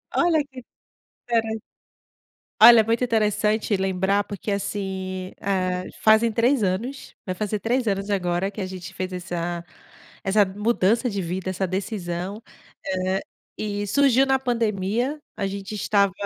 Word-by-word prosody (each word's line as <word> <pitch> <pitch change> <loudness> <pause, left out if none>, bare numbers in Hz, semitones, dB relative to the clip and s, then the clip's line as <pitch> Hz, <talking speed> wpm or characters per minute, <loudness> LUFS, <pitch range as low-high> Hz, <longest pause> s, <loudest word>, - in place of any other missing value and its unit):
Olha 330 -3 +3
que 260 -2 -10 0.7
interes 225 -1 0 1.0
Olha, 225 0 +10
muito 230 +3 0
interessante 215 -2 +1
lembrar, 190 +1 +1
porque 205 +1 -6
assim, 190 -2 -3
hã, 185 -2 -1 0.2
fazem 220 +1 +5
3 240 +2 +2
anos, 220 +9 -2
vai 185 - -4
fazer 210 +1 -2
3 240 +3 0
anos 195 0 -1
agora, 180 -1 0
que 205 +1 -10
a 190 - -1
gente 185 0 -8
fez 185 0 -4
essa 175 -1 -3 0.6
essa 205 +1 +4
mudança 220 +3 +1
de 200 -2 -2
vida, 185 +2 -3
essa 190 0 -1
decisão, 190 0 -4 0.7
hã, 190 +1 +1 0.4
e 205 -1 -2
surgiu 270 +2 +4
na 265 0 +2
pandemia, 235 +2 -1 0.2
a 200 - -1
gente 200 +1 -5
estava 200 -1 +2
205 Hz, 135 wpm, -24 LUFS, 190-225 Hz, 1.0 s, Olha